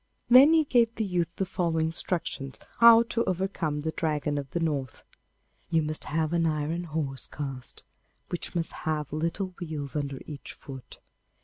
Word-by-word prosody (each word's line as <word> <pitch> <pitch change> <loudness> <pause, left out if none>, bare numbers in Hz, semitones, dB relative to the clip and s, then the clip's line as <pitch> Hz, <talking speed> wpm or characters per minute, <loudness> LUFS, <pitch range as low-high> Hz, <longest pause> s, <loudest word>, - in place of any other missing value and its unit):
Then 270 +6 +9
he 320 -1 +5
gave 235 -5 +2
the 220 - -1
youth 175 -3 0
the 195 - -1
following 170 -4 0
instructions 160 -4 -3 0.2
how 230 0 +9
to 230 0 -1
overcome 180 -5 -1
the 160 +1 -2
Dragon 150 -3 -1
of 140 -1 -7
the 170 - -2
North: 145 -6 -2 0.7
'You 165 -2 +2
must 155 0 0
have 160 +1 -1
an 165 -1 +2
iron 155 +3 -1
horse 150 -4 -3
cast, 135 -4 -5 0.5
which 175 0 -5
must 165 -1 -1 0.2
have 150 -2 -2
little 170 +5 -2
wheels 155 -5 -5
under 140 -2 -2
each 145 -3 -8
foot. 135 -3 -11
160 Hz, 165 wpm, -28 LUFS, 150-180 Hz, 0.7 s, Then